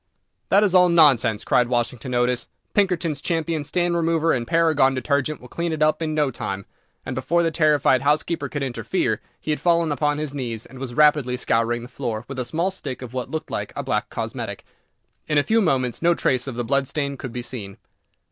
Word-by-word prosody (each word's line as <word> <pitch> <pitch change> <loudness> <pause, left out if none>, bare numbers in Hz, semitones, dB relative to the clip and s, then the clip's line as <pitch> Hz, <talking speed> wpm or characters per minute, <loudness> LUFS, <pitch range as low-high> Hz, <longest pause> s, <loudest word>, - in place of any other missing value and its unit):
"That 200 +2 +5
is 200 -3 +2
all 180 -1 +6
nonsense," 135 -10 +4
cried 125 - +3
Washington 120 +1 -2
Otis; 120 0 +1 0.3
"Pinkerton's 175 -7 +1
Champion 165 -2 -1
Stain 175 +4 0
Remover 165 -1 +2
and 120 -2 -2
Paragon 155 -5 +3
Detergent 140 +2 0
will 125 - -12
clean 170 +6 -3
it 155 -1 0
up 155 +2 +2
in 155 -1 -1
no 150 -3 +1
time," 100 -5 -5 0.4
and 130 - -4
before 170 +7 +1
the 165 - +1
terrified 150 -5 +3
housekeeper 150 +4 0
could 145 -2 -3
interfere, 130 -3 -1 0.2
he 155 - -3
had 150 - -1
fallen 170 -2 +2
upon 145 0 0
his 150 -2 -3
knees, 120 -5 -4
and 130 +1 -12
was 130 -3 -6
rapidly 145 -4 +4
scouring 120 -1 0
the - - -8
floor 120 -4 -4
with 135 -1 -6
a 125 - -2
small 170 +8 -1
stick 140 -9 -6
of 125 -1 -9
what 130 -1 -4
looked 160 -1 -5
like - - -3
a - - -3
black - - -1
cosmetic. - - -5 0.6
In 150 - +1
a 145 - +5
few 225 +6 +2
moments 130 - 0
no 170 0 +4
trace 130 -4 +1
of 130 - -5
the 120 0 -3
blood 140 +2 +1
stain 140 0 -2
could 130 -2 -7
be 120 +1 -5
seen. 100 -6 -7
140 Hz, 210 wpm, -23 LUFS, 125-165 Hz, 0.6 s, all